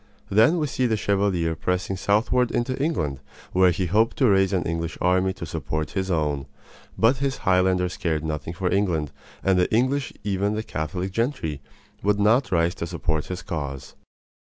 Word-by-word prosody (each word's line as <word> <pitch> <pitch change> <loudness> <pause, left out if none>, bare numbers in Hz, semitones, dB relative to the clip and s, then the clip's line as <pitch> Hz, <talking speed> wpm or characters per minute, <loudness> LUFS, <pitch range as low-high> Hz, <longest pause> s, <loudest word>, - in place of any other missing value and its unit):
Then 110 - +5
we 155 - +1
see 130 -2 0
the 110 -2 +1
Chevalier 95 -5 +1
pressing 90 +3 -1
southward 110 +6 +2
into 130 +2 -1
England, 75 - -1 0.3
where 95 0 +5
he 90 +2 0
hoped 110 +6 +2
to 130 - +4
raise 95 -2 +4
an 95 -3 +1
English 85 0 -3
army 90 +1 +2
to 95 - -7
support 80 -1 -3
his 95 -1 -2
own. 75 -5 0 0.5
But 115 +4 +4
his 135 0 -1
Highlanders 90 -1 +2
cared 80 -3 -1
nothing 80 0 -4
for 90 +1 -1
England, 85 -7 0 0.3
and 95 -1 +3
the 90 - +1
English 130 +4 +1
even 100 +1 0
the 110 - -2
Catholic 90 +2 -3
gentry 100 - -2 0.4
would 105 +1 +1
not 115 +4 +3
rise 85 -1 +2
to 85 - -1
support 80 -3 -2
his 90 0 -5
cause. 70 -7 -5
95 Hz, 175 wpm, -24 LUFS, 85-110 Hz, 0.5 s, Then